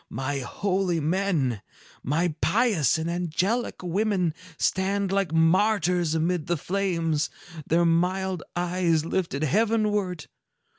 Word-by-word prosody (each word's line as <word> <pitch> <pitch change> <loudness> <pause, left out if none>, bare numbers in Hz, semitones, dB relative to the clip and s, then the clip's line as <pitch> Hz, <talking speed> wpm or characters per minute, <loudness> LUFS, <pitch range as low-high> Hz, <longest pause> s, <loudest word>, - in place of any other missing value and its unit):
My 135 +1 -3
holy 185 +5 -1
men, 155 - 0 0.4
my 160 +5 0
pious 200 - +2
and 160 +1 -3
angelic 180 +7 -1
women, 185 -2 0 0.2
stand 195 +1 0
like 195 -4 0
martyrs 175 0 +2
amid 165 0 0
the 175 - 0
flames, 165 -3 -1 0.4
their 170 +2 +3
mild 180 +2 +1
eyes 175 -2 +1
lifted 165 -4 -2
heavenward. 210 - +1
175 Hz, 105 wpm, -26 LUFS, 160-195 Hz, 0.4 s, their